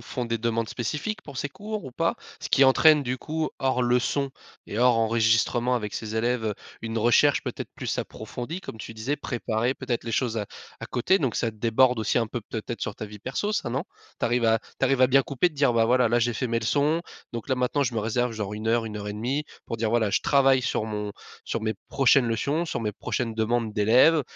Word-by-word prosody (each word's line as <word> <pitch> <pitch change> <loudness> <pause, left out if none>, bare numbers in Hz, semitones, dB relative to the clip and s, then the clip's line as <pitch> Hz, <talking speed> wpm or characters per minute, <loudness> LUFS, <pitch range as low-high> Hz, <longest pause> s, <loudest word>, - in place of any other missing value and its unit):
font 125 +1 -4
des 115 0 -2
demandes 115 0 -1
spécifiques 150 - -3
pour 140 -3 -10
ces 145 - -2
cours 210 -1 -6
ou 130 - -7
pas? 165 +6 0 0.3
Ce - - -5
qui 135 - +4
entraîne 150 +3 +6
du 130 0 -3
coup, 155 +4 -2
hors 130 -1 +1
leçon 125 +3 +1 0.4
et 105 - -4
hors 125 -1 +5
enregistrement 115 +2 +2
avec 105 -4 -2
ces 110 0 -5
élèves, 120 +1 0
heu, 105 -1 -1 0.3
une 115 0 -4
recherche 120 +6 +4
peut-être - - -5
plus - - -3
approfondie 125 - -5
comme 110 - -8
tu 115 +2 -8
disais. 120 +7 -2
Préparer 120 0 -1
peut-être 125 -3 -3
les 115 - -4
choses 115 -2 0
à 105 - -3 0.3
à - - -5
côté 160 +10 +2
donc 130 -7 -1
ça 115 - 0
déborde 115 +3 +2
aussi 110 +1 0
un 115 -2 0
peu, 120 - -4
peut-être 115 +2 -6
sur - - -3
ta 110 - -6
vie 105 0 -11
perso 135 - -2
ça, 210 - -1
non? 130 - -1 0.4
Tu - - +1
arrives 120 0 +1
à 115 0 +3 0.2
tu - - +2
arrives 135 0 +2
à 130 - +6
bien 135 +1 +5
couper 140 +7 +1
de 155 - -19
dire: 140 -3 +3
«Bah 115 -1 +4
voilà, 125 +1 +3
là 120 +1 +3
j'ai 120 +1 +1
fait 125 +4 -2
mes 115 -1 0
leçons 145 +8 +1 0.3
donc 115 +3 -6
là 130 - +4
maintenant 125 +3 +1
je 125 -3 -1
me 115 - 0
réserve 115 +3 0
genre 105 -2 -4
1:00 115 +2 0
1:30 105 +7 -3 0.2
pour 115 - -3
dire 110 -1 -1
voilà 115 -2 +2
je - - +2
travaille 135 -2 +4
sur 110 - -1
mon 105 -1 -4 0.3
sur 115 - -2
mes 110 -1 -1
prochaines 135 -1 +4
leçons, 140 +8 0
sur 120 - -3
mes 105 -2 -2
prochaines 115 +2 -3
demandes 115 0 0
d'élèves, 125 +9 +5
120 Hz, 230 wpm, -26 LUFS, 110-135 Hz, 0.4 s, entraîne